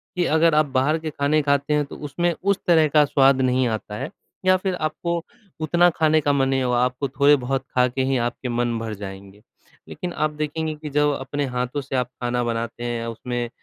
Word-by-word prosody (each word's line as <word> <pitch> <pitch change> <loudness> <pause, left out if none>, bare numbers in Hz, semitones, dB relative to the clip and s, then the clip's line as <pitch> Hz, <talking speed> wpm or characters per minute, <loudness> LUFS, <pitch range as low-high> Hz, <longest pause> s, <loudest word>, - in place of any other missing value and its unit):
कि 180 -1 +1
अगर 160 0 +3
आप 155 0 +4
बाहर 135 +3 +1
के 160 -1 -4
खाने 145 +1 +1
खाते 140 +1 +1
हैं 150 -1 +2
तो - - -10
उसमें 170 +4 -1
उस 200 0 +2
तरह 160 -3 +5
का 150 +1 +4
स्वाद 135 -2 +4
नहीं 130 0 +2
आता 110 -2 -4
है। 135 +4 -4 0.4
या 185 - +6
फ़िर 185 0 -2
आपको 170 +1 -2 0.4
उतना 175 +3 +4
खाने 155 -1 +2
का 145 0 +1
मन 135 -1 +2
नहीं 135 -1 +1
होगा, 125 -1 +1
आपको 125 +2 -1
थोड़े-बहुत 135 -1 +2
खा 125 0 +4
के 130 +2 -3
ही 135 0 +1
आपके 120 +1 -3
मन 120 -1 0
भर 115 -1 -4
जाएँगे। 100 0 -10 0.5
लेकिन 175 -1 -5
आप 155 -1 0
देखेंगे 155 +1 -3
कि 150 0 -8
जब 150 +1 +2
अपने 140 +2 -3
हाथों 125 +3 -2
से 135 0 -5
आप 125 -1 +1
खाना 120 0 0
बनाते 115 0 -3
हैं 120 -1 -3
उसमें 120 +1 -4
140 Hz, 210 wpm, -23 LUFS, 125-155 Hz, 0.5 s, या